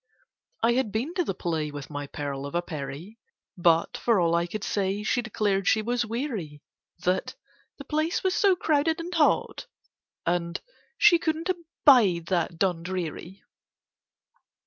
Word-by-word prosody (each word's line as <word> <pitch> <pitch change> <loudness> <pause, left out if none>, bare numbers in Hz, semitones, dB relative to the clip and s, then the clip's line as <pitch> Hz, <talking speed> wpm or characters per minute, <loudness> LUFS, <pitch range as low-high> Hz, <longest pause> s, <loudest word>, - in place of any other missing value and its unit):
I 235 +1 +4
had 245 -4 0
been 240 - -2
to 360 -1 +1
the 195 - -3
play 160 -4 -2
With 145 0 -8
my 145 -1 -5
pearl 140 -1 -5
of 140 - -8
a 175 - +1
Peri— 155 +7 -7 0.4
But, 170 -2 +2
for 230 -4 +2
all 170 -1 +2
I 170 +1 +1
could 205 +3 -5
say, 200 0 -1
She 245 +3 +1
declared 205 -3 -1
she 220 - +3
was 240 +1 -1
weary, 220 - -4 0.4
That 185 +1 0 0.4
"the 280 - -10
place 310 +4 -1
was 375 -1 +2
so 395 -1 +4
crowded 320 -1 +1
and 345 +2 -5
hot, 325 +7 +1 0.6
and 170 0 -1 0.4
she 345 - +6
couldn't 325 +2 -2
abide 260 - +3
that 170 -2 0
Dundreary." 180 0 -3
195 Hz, 150 wpm, -26 LUFS, 170-280 Hz, 0.6 s, she